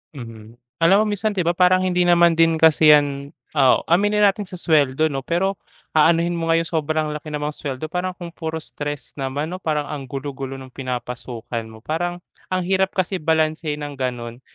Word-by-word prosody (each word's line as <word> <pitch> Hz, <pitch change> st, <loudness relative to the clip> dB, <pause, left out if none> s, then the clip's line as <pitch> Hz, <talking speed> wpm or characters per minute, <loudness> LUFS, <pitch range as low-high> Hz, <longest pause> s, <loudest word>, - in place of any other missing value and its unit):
Mhm. 115 Hz, -3 st, -10 dB, 0.2 s
Alam 195 Hz, +6 st, +5 dB
mo -, -, -2 dB
minsan, 210 Hz, +1 st, -1 dB
'di 190 Hz, -, +1 dB
ba 170 Hz, -, +2 dB
parang 185 Hz, 0 st, +4 dB
hindi 180 Hz, -1 st, +1 dB
naman 170 Hz, -1 st, +4 dB
din 165 Hz, 0 st, +4 dB
kasi 160 Hz, -1 st, +6 dB
'yan 140 Hz, 0 st, +1 dB, 0.2 s
oo, 130 Hz, -3 st, +5 dB
aminin 205 Hz, +4 st, +3 dB
natin 200 Hz, 0 st, +2 dB
sa 180 Hz, -, -9 dB
suweldo 155 Hz, -3 st, +2 dB
'no, 135 Hz, -1 st, -4 dB
pero 190 Hz, +3 st, 0 dB, 0.4 s
aanuhin 170 Hz, +2 st, +3 dB
mo 165 Hz, -, -2 dB
nga 165 Hz, -, +3 dB
yung 165 Hz, -, -5 dB
sobrang 155 Hz, -1 st, -1 dB
laki 150 Hz, +1 st, -7 dB
namang 150 Hz, 0 st, -2 dB
suweldo, 145 Hz, +1 st, -5 dB
parang 180 Hz, +2 st, -2 dB
kung 175 Hz, -1 st, -8 dB
puro 160 Hz, -1 st, -5 dB
stress 145 Hz, -1 st, -6 dB
naman 140 Hz, +5 st, -3 dB
'no. 185 Hz, -, -4 dB
Parang 150 Hz, -4 st, -2 dB
ang 140 Hz, -2 st, -5 dB
gulo-gulo 135 Hz, 0 st, -5 dB
nung 130 Hz, -1 st, -10 dB
pinapasukan 125 Hz, -2 st, -5 dB
mo. 110 Hz, 0 st, -13 dB
Parang 175 Hz, +4 st, -3 dB, 0.3 s
ang 185 Hz, 0 st, -1 dB
hirap 190 Hz, +1 st, +1 dB
kasi 185 Hz, 0 st, -1 dB
balansehin 155 Hz, -1 st, 0 dB
ng 145 Hz, -2 st, -7 dB
gano'n. 120 Hz, -2 st, -4 dB
155 Hz, 190 wpm, -21 LUFS, 135-175 Hz, 0.4 s, kasi